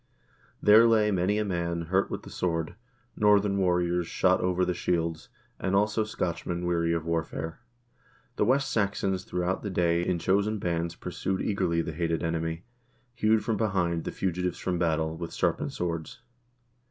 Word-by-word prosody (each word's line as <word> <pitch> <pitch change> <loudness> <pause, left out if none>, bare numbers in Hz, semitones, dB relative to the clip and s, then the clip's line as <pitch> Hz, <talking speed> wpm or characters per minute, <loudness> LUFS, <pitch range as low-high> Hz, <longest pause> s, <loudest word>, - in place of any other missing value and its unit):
There 110 +3 +8
lay 110 -2 +4
many 95 +2 +1
a 105 - 0
man 85 -3 -2
hurt 95 +4 +1
with - - -5
the - - -11
sword, 85 -2 -2 0.4
Northern 105 -1 +3
warriors, 90 -2 +1
shot 95 +1 +2
over 90 0 +1
the 90 - 0
shields, 85 -2 -2 0.3
and 95 +1 0
also 105 +2 +2
Scotchmen, 90 -4 -3
weary 85 -1 +1
of 85 -1 -1
warfare. 80 0 -3 0.8
The - - +2
West 135 +1 +2
Saxons 100 -4 0
throughout 90 +1 -1
the 105 - -4
day, 85 -2 +1
in 90 0 0
chosen 100 +5 +1
bands, 85 -3 -2
pursued 95 +2 -3
eagerly 90 -5 0
the 80 - -5
hated 85 +1 -1
enemy, 80 +1 -2 0.5
hewed 110 -2 +2
from 115 -3 0
behind 90 -6 0
the - - -3
fugitives 90 -1 -2
from 90 -2 -2
battle, 80 -2 0
with 85 0 -6
sharpened - - 0
swords. 85 +4 -4
90 Hz, 160 wpm, -28 LUFS, 85-100 Hz, 0.8 s, There